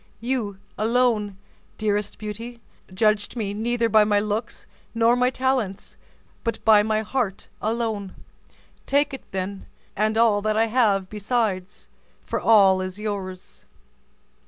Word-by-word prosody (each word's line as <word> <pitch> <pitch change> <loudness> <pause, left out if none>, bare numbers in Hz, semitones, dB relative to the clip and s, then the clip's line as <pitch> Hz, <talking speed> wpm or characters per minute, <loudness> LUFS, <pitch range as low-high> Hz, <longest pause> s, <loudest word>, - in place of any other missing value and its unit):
You 230 -4 -2 0.2
alone, 220 -3 +1 0.4
dearest 210 -1 -1
Beauty, 230 +3 -7 0.3
judged 210 +3 +1
me 210 -4 -2
neither 230 +2 0
by 215 -1 +5
my 205 -1 +2
looks 210 +2 -3 0.3
nor 230 +1 +4
by - - -2
my 250 0 +4
talents, 255 -7 -2 0.5
but 230 - -1
by 215 -2 +7
my 215 0 0
heart 220 -3 -3
alone. 220 -3 -2 0.7
Take 285 0 +2
it 270 - -9
then, 190 +1 -4 0.3
and 215 +2 +1
all 225 -3 +4
that 215 +1 0
I 225 - +4
have 215 -5 +2
besides, 210 -2 -2 0.4
for - - -2
all 195 -4 +5
is 185 +1 -5
yours." 195 -3 -6
215 Hz, 135 wpm, -24 LUFS, 200-230 Hz, 0.7 s, by